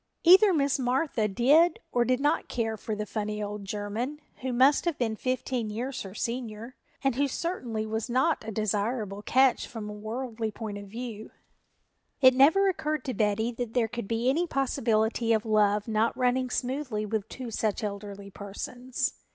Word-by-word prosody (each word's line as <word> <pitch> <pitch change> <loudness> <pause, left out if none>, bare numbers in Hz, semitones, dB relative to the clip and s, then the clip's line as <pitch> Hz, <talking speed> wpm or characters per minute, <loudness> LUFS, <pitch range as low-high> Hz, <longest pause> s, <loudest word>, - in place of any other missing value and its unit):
Either 380 +4 +8
Miss 285 -4 +1
Martha 255 -2 +1
did 280 - +4
or 240 - +3
did 255 +1 +1
not 290 +2 +1
care 225 -2 -2
for 215 +1 -4
the 210 0 -3
funny 210 0 -3
old 205 0 -5
German 210 +8 -3 0.2
who 260 0 -3
must 265 +6 +4
have 340 -4 0
been 225 -3 -1
fifteen 255 -1 -2
years 250 +5 -4
her 195 0 -8
senior, 235 +1 -4 0.3
and 270 -1 +2
who 285 +1 +2
certainly 250 -8 -3
was 220 +2 -3
not 265 +6 +2
a 220 - -6
desirable 210 0 -1
catch 260 +3 +3
from 225 -3 -7
a 210 - -6
worldly 225 +1 -4
point 210 -1 -6
of 200 - -10
view. 225 0 -7 0.9
It 260 -2 +7
never 315 +10 +5
occurred 310 -5 -1
to 260 - -2
Betty 215 +2 +1
that 240 -1 -5
there 235 -3 +3
could 235 -2 -5
be 230 +2 -1
any 325 +7 +2
possibility 230 -5 +1
of 220 0 0
love 210 -1 +2
not 220 +1 +1
running 255 0 +1
smoothly 250 -4 -2
with 215 0 -3
two 250 -3 -7
such 220 0 -1
elderly 200 -1 -6
persons. 245 +6 -4
235 Hz, 175 wpm, -28 LUFS, 215-260 Hz, 0.9 s, Either